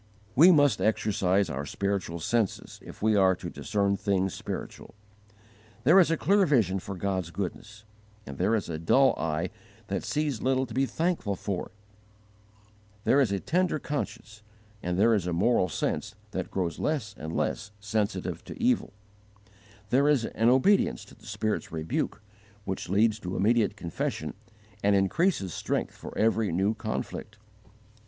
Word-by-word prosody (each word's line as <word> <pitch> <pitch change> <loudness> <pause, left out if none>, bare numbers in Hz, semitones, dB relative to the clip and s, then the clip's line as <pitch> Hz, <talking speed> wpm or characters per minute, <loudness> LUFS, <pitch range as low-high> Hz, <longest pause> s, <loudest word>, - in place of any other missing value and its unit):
We 170 +8 +8
must 145 -5 +4
exercise 100 -3 +2
our 70 +2 -4
spiritual 95 +1 -2
senses 110 +4 -1
if - - -11
we 110 -1 +4
are 95 -2 +4
to 85 -1 -7
discern 100 -1 0
things 95 -2 0
spiritual. - - -7 0.9
There 165 +8 +7
is 175 - +5
a 165 - +1
clear 200 +5 +3
vision 105 - +2
for 95 +1 -7
God's 95 -2 -2
goodness, 105 +4 -6 0.4
and 70 - -9
there 100 +5 +3
is 105 - -2
a 80 -2 -4
dull 130 +12 +4
eye 80 +2 -2 0.4
that - - -2
sees 150 -6 -1
little 130 0 +1
to 120 - -10
be 135 +3 +1
thankful 160 - -1
for; 95 0 -4 1.3
there 140 - +4
is 120 -7 +2
a 100 - 0
tender 175 - +1
conscience, 110 -7 -5 0.4
and 90 0 -2
there 115 +4 +5
is 100 -5 0
a 90 - -1
moral 95 +1 +2
sense - - -2 0.2
that - - -3
grows 85 -4 -2
less 135 -10 -1
and 80 -2 -5
less - - -1
sensitive 100 -4 -2
to - - -9
evil; 245 - +1 1.0
there 135 +3 +4
is 135 -6 +3
an 115 +1 +1
obedience 160 +11 +3
to - - -16
the - - -17
Spirit's 110 -1 -2
rebuke 80 +6 -3 0.4
which 95 -2 -4
leads 110 +3 +3
to 90 -1 -5
immediate 110 0 +2
confession 85 -4 -3 0.5
and 100 0 +3
increases 100 - +1
strength - - -2
for - - -9
every 110 -2 +2
new 95 +5 +1
conflict. 110 -1 -5
105 Hz, 155 wpm, -28 LUFS, 95-130 Hz, 1.3 s, We